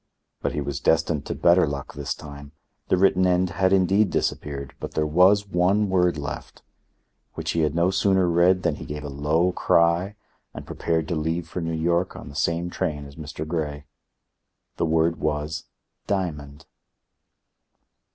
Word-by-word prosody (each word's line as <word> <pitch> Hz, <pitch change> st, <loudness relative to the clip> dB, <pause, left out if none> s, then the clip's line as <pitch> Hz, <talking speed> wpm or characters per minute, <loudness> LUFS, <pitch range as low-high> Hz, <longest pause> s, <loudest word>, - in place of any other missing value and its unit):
But -, -, -1 dB
he 75 Hz, -, -2 dB
was 70 Hz, -1 st, -3 dB
destined 80 Hz, -2 st, +1 dB
to -, -, -3 dB
better 85 Hz, -1 st, +4 dB
luck 70 Hz, -1 st, -5 dB
this 70 Hz, -1 st, -4 dB
time. 70 Hz, 0 st, -11 dB, 0.3 s
The 95 Hz, -, +2 dB
written 95 Hz, 0 st, +4 dB
end 90 Hz, 0 st, +2 dB
had 95 Hz, -1 st, +1 dB
indeed 95 Hz, +2 st, +3 dB
disappeared, 70 Hz, -5 st, -3 dB
but -, -, -7 dB
there 75 Hz, -, +1 dB
was 90 Hz, +6 st, +4 dB
one 95 Hz, +3 st, +2 dB
word 90 Hz, -3 st, +2 dB
left, 70 Hz, -1 st, -7 dB, 0.7 s
which -, -, -3 dB
he 85 Hz, -, -1 dB
had 75 Hz, -1 st, +1 dB
no 85 Hz, +2 st, +2 dB
sooner 95 Hz, -1 st, +2 dB
read 90 Hz, +2 st, +3 dB
than 75 Hz, -, 0 dB
he -, -, -8 dB
gave 75 Hz, 0 st, -6 dB
a 75 Hz, -, -5 dB
low 75 Hz, +6 st, +1 dB
cry 85 Hz, +3 st, +2 dB, 0.4 s
and -, -, -8 dB
prepared 80 Hz, -2 st, -1 dB
to 85 Hz, -, 0 dB
leave 80 Hz, +2 st, -2 dB
for 90 Hz, -, -5 dB
New 80 Hz, 0 st, -2 dB
York 85 Hz, +2 st, 0 dB
on -, -, -9 dB
the 70 Hz, -, -12 dB
same 85 Hz, +3 st, -1 dB
train 75 Hz, -6 st, -3 dB
as 70 Hz, 0 st, -12 dB
Mr. 75 Hz, 0 st, -7 dB
Grey. 75 Hz, -3 st, -3 dB, 0.9 s
The -, -, 0 dB
word 80 Hz, +1 st, +2 dB
was—diamond. 75 Hz, 0 st, -4 dB
85 Hz, 165 wpm, -24 LUFS, 75-90 Hz, 0.9 s, better